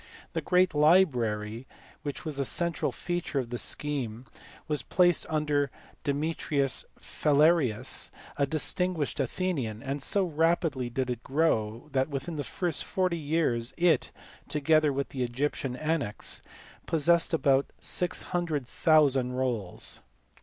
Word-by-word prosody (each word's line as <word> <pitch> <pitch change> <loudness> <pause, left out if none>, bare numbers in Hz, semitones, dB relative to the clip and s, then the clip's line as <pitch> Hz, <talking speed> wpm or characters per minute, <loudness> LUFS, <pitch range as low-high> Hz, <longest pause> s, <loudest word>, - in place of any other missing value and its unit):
The - - -1
great 180 -1 +3
library 125 - +2 0.3
which 145 -2 -6
was 155 -3 -4
the 140 - +1
central 170 +5 +1
feature 175 -4 -3
of 125 -3 -2
the 120 - -1
scheme 130 -5 -3 0.4
was 150 -4 0
placed 175 +3 +2
under 150 -2 +1 0.3
Demetrius 145 -2 -1
Phalereus, 140 -5 +2 0.3
a 140 - +1
distinguished 160 +1 0
Athenian; 135 - -2
and 140 +1 -3
so 195 +8 +2
rapidly 160 -5 +1
did 130 +1 -2
it 120 -1 -4
grow 120 -5 0
that 135 +2 +1
within 145 +2 -4
40 175 +4 -1
years 145 -7 0
it 170 -5 +3 0.4
(together 155 0 +3
with 140 0 -2
the 130 - -5
Egyptian 125 +1 -2
annexe) 155 -7 -3 0.5
possessed 165 +1 +3
about 140 -4 +2
600,000 150 -6 +2
rolls. 120 -8 -1
145 Hz, 115 wpm, -28 LUFS, 130-165 Hz, 0.5 s, great